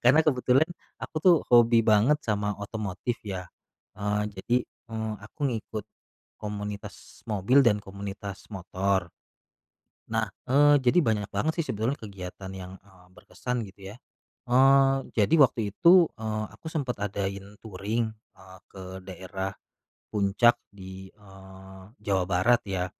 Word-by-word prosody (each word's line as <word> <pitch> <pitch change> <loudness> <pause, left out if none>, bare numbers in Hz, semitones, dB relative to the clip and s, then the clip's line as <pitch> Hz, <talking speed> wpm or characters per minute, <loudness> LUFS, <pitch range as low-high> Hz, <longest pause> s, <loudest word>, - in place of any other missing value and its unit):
karena 130 +6 +6
kebetulan 130 +1 +3 0.3
aku - - -8
tuh 180 -2 +7
hobi 115 -1 +6
banget 110 +8 +4
sama 105 -1 0
otomotif 105 +2 -4
ya, 95 -4 -5 0.5
eee, 105 0 -1
jadi, 110 +6 0 0.3
eee, 110 -1 -3
aku 110 +8 -15
ngikut, 110 -3 -4 0.5
komunitas 105 -1 -7
mobil 115 +6 +3
dan 105 -3 +3
komunitas 100 0 -7
motor. 95 -1 -1 1.0
Nah, - - -1 0.2
eee, 145 +2 +6
jadi 135 +7 +3
banyak 105 -4 0
banget 160 +2 0
sih 165 - 0
sebetulnya 115 +7 -1
kegiatan 95 -2 -8
yang, 95 -1 -8
eee, 95 -2 -21
berkesan 120 +4 -5
gitu 95 0 -11
ya, - - -11 0.6
eee, 135 +2 +6 0.2
jadi 105 +7 +3
waktu 115 -7 +4
itu, 170 - +6
eee, 110 -1 -2
aku - - -16
sempet 145 -7 -3
adain 100 0 -4
touring, 110 +2 -2 0.2
eee, 95 0 -15
ke 95 - -11 0.2
daerah, 95 +1 -5 0.6
Puncak 105 +3 +4 0.2
di, 95 -1 -10
eee, 95 -1 -14 0.2
Jawa 95 -2 +2
Barat, 110 +7 +3
ya. 90 -2 -1
105 Hz, 130 wpm, -27 LUFS, 95-120 Hz, 1.0 s, tuh